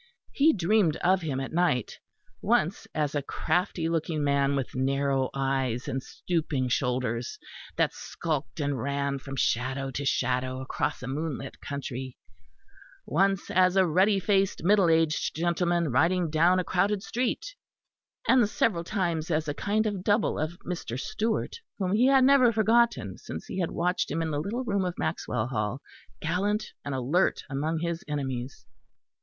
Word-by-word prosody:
He 300 +3 +4
dreamed 190 - +2
of 185 +2 +2
him 145 -5 -2
at 135 - -5
night, 165 -9 +1 0.4
once - - +1
as 150 -2 0
a 145 - 0
crafty 165 +4 -1
looking 160 -2 -1
man 140 0 +2
with 135 -3 -3
narrow 135 0 +1
eyes 135 -2 -1
and 135 -1 -2
stooping 150 -5 -2
shoulders, 125 -2 -1 0.4
that - - +1
skulked 145 -7 -4
and 140 -4 -1
ran 140 0 -1
from 135 0 -7
shadow 130 +2 0
to 140 +3 -4
shadow 130 -1 0
across 130 0 -3
a - - -5
moonlit 140 -1 -4
country; 130 -2 -5 0.9
once 195 +3 +1
as 185 0 +4
a 190 -1 +5
ruddy 190 +5 +3
faced 195 -3 +1
middle 195 -1 +4
aged 160 -1 +2
gentleman 170 -1 +1
riding 170 +5 +2
down 170 +4 +4
a 185 - +1
crowded 195 +3 +1
street; 255 - -2 0.7
and 245 -5 +5
several 180 -6 +1
times 170 -4 -1
as 155 -1 0
a 145 - -1
kind 210 +7 0
of 200 -4 -2
double 210 +2 +2
of 155 +3 -3
Mr. 165 -9 -4
Stewart, 220 +9 -2 0.2
whom 190 -2 -1
he 235 +5 +4
had 270 -1 +5
never 260 -3 +6
forgotten, 220 - +2
since 80 - -7
he 190 - -5
had 175 - 0
watched 180 +2 0
him 165 +3 -1
in 160 - -2
the 145 - -1
little 230 +9 -3
room 200 -5 0
of 180 -1 -3
Maxwell 110 - -2
Hall, 115 0 -2 0.4
gallant 200 +6 -1
and 140 -1 -3
alert 140 +9 +1
among 155 +4 -1
his 170 -1 -2
enemies. 130 -6 -4
160 Hz, 160 wpm, -27 LUFS, 135-185 Hz, 0.9 s, never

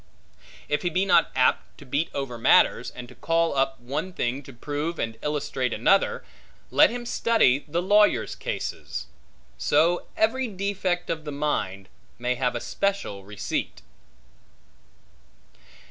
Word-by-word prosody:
If 150 - 0
he 175 - 0
be 185 +3 +1
not 175 -3 +4
apt 125 -1 +1
to 145 - -13
beat 140 +5 -1
over 135 -4 -4
matters, - - +4
and 125 -1 -9
to 125 - -13
call 165 +2 0
up 135 0 0
one 140 +10 -4
thing 130 -3 -2
to 140 - -12
prove 145 +6 -4
and 115 0 -3
illustrate 135 -4 -2
another, 190 - +2 0.5
let - - +6
him 240 +1 -5
study 225 - +3
the 170 +4 -1
lawyers' 195 - +3
cases. 60 - -5 0.5
So 165 +4 +2
every 250 +4 +2
defect 195 -3 -2
of 160 -1 -3
the 150 - -5
mind, 100 -10 -2 0.3
may 125 +1 0
have 125 -1 -1
a - - -1
special 200 - -2
receipt. 100 +1 -4
150 Hz, 140 wpm, -25 LUFS, 125-185 Hz, 0.5 s, let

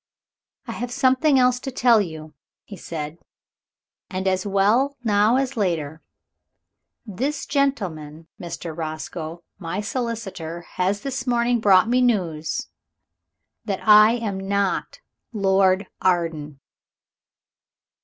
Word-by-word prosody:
"I - - -6
have 245 - -4
something 270 +2 +3
else 250 -1 +3
to 270 - -5
tell 240 -3 +4
you," 155 -4 -7 0.3
he 205 - -10
said, 160 -2 -6 0.9
"and 190 0 -3
as 185 +1 0
well 220 +9 +2
now 210 +1 +3
as 270 0 0
later. 165 -7 -2 1.0
This 270 +8 -3
gentleman, 175 - -2 0.2
Mr. 170 -1 -6
Roscoe, 160 +1 -6 0.2
my 175 +1 -4
solicitor, 205 -7 -4
has 190 +3 -2
this 265 0 -4
morning 240 0 +2
brought 200 -2 +5
me 250 +2 +2
news 175 -10 0 1.0
that 200 0 -4
I 215 +1 +8
am 215 -5 -3
not 200 0 -2 0.3
Lord 195 -1 +2 0.2
Arden!" 165 -6 -1
200 Hz, 110 wpm, -23 LUFS, 170-245 Hz, 1.0 s, I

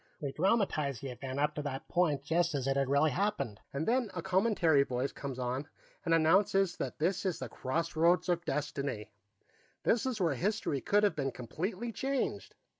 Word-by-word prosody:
We 140 -2 -3
dramatize 155 - +1
the 135 +1 -5
event 130 +2 -5
up 150 +1 +2
to 150 - -3
that 145 +1 -5
point 155 -6 +1
just 165 +2 +1
as 135 -3 -1
it 135 - +2
really 140 +3 +3
happened, 140 - -1
and 140 +3 -3
then 245 -1 +2
a - - -3
commentary 185 -6 +3
voice 130 0 -1
comes 135 -3 -6
on 130 +3 -2 0.4
and 170 - -1
announces 185 +3 +3
that - - -4
this 180 +4 0
is 185 -4 -1
the 130 - -6
Crossroads 165 +8 +1
of 175 -1 +1
Destiny; 140 -9 -3 0.7
this 235 +2 +2
is 245 -4 -2
where 170 -5 +2
history 180 - -1
could 205 +1 +2
have 205 - +3
been 135 -2 -1
completely 185 - -4
changed. 270 +3 -2
155 Hz, 180 wpm, -32 LUFS, 140-190 Hz, 0.7 s, really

